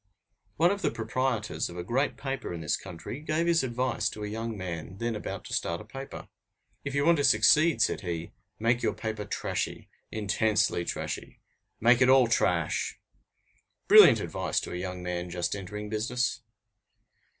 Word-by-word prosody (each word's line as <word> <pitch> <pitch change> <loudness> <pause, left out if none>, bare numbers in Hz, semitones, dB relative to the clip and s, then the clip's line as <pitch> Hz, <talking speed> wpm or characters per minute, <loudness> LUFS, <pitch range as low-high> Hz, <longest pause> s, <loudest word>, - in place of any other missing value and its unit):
One 170 +3 +4
of 200 0 -2
the - - +2
proprietors 115 -1 -2
of 85 - -9
a 90 - -4
great 130 +9 0
paper 135 -6 -4
in 85 -1 -5
this 75 - 0
country 90 - -8
gave 155 +2 -1
his 170 -1 +3
advice 120 -3 -1
to 105 - -7
a - - -3
young 110 +1 -4
man 90 0 -6
then 115 +1 -2
about 105 - -6
to - - -7
start 85 0 -1
a 105 - -10
paper: 135 +5 -8 0.6
"If 140 0 -4
you 140 0 +2
want 170 0 +5
to - - +2
succeed," 150 +9 +5
said - - 0
he, 85 -3 -4 0.3
"make 120 +2 +1
your - - 0
paper 110 -2 -4
trashy, - - -3 0.2
intensely 105 -3 +1
trashy, - - -5 0.4
make 120 +2 +5
it 130 - +6
all 130 -1 +7
trash!" 90 -7 0 0.9
Brilliant - - +9
advice - - -1
to - - -7
a - - -4
young 90 0 -5
man 90 0 -3
just 90 +2 -2
entering 105 +2 -6
business! 120 +4 -1
110 Hz, 170 wpm, -28 LUFS, 90-130 Hz, 0.9 s, Brilliant